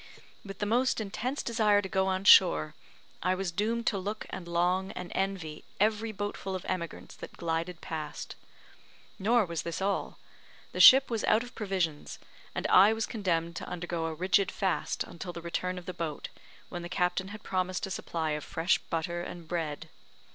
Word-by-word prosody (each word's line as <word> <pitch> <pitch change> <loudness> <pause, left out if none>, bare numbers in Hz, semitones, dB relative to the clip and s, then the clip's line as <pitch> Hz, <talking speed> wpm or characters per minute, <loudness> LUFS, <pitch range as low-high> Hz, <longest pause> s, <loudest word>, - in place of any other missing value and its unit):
With 195 -2 -8
the 205 - -1
most 245 +5 +2
intense 220 +6 -3
desire 215 -3 +3
to 200 - -3
go 190 0 +1
on 190 0 0
shore, 175 -6 +6 0.5
I 185 0 +2
was 190 -1 -2
doomed 225 +6 -1
to 200 - +1
look 205 +3 -4
and 180 -2 -6
long 180 +3 +1
and 180 -1 -7
envy 190 -6 -3 0.2
every 215 +2 +1
boatful 205 -2 -4
of 185 - -6
emigrants 170 -3 -4
that - - -10
glided 165 +1 -2
past. 155 -2 -5 0.8
Nor 225 +2 +3
was 170 -3 -3
this 170 -1 -4
all; 195 +1 -1 0.5
the - - -5
ship 265 0 +9
was 225 -2 -1
out 220 +2 +3
of 245 - -11
provisions, 185 -8 -2 0.4
and - - -3
I 200 +4 +7
was 220 -1 -1
condemned 170 -6 -1
to - - -6
undergo 170 -2 -3
a 160 - -3
rigid 190 +3 +2
fast 190 -4 -1
until 175 +1 -8
the 170 - -6
return 180 +2 -2
of 180 - -8
the 185 - -5
boat, 160 -4 -4 0.4
when 175 - -5
the 175 - -7
captain 180 +1 0
had 215 +1 -9
promised 185 -1 -1
a 195 - -7
supply 160 -3 -2
of 150 -1 -2
fresh 165 +3 +1
butter 170 +1 -3
and 175 -1 -8
bread. 160 -2 -3
185 Hz, 185 wpm, -30 LUFS, 170-205 Hz, 0.8 s, ship